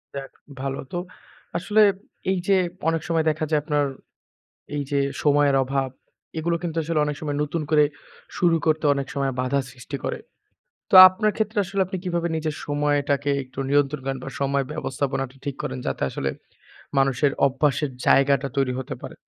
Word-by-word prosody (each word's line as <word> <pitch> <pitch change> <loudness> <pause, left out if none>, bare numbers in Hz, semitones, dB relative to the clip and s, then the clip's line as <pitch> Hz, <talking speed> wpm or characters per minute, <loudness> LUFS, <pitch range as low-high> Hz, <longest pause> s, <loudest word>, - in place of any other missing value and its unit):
যাক 135 -1 -6 0.3
ভালো। 135 0 -3
তো - - -3 0.6
আসলে 210 +5 +2 0.5
এই 190 - +1
যে 200 - +5 0.3
অনেক 165 -1 0
সময় 165 -1 +1
দেখা 155 +1 -1
যায়, 150 - +3
আপনার 145 -2 +1 0.9
এই 145 - 0
যে 140 - +2 0.2
সময়ের 145 -1 +4
অভাব 135 0 -1 0.5
এগুলো 170 +1 0
কিন্তু 165 -2 -4
আসলে 155 0 0
অনেক 150 - -2
সময় 145 -2 -3
নতুন 155 +2 -2
করে 150 -1 +5 0.5
শুরু 170 -2 +4
করতে 155 0 +2
অনেক 140 -1 -3
সময় 135 -1 0
বাধা 135 +2 +1
সৃষ্টি 130 +2 -7
করে। - - -2 0.7
তো - - +1
আপনার 210 +3 0
ক্ষেত্রে 215 -1 -1
আসলে 195 +2 -3
আপনি 190 +1 -4
কিভাবে 170 -1 -1
নিজের 155 -1 -2
সময়টাকে 145 -1 +1
একটু 130 +1 -19
নিয়ন্ত্রণ 145 0 +2
করেন 135 -1 -2
বা - - -5
সময় 140 0 +1
ব্যবস্থাপনাটা 135 -3 -3
ঠিক 140 -2 -4
করেন? 65 - -4
যাতে - - -2
আসলে 70 - -2 0.7
মানুষের 135 +1 +3 0.2
অভ্যাসের 140 +1 0
জায়গাটা 140 0 +4
তৈরি 130 -2 +1
হতে 130 - -5
পারে? - - -8
145 Hz, 165 wpm, -24 LUFS, 135-160 Hz, 0.9 s, যে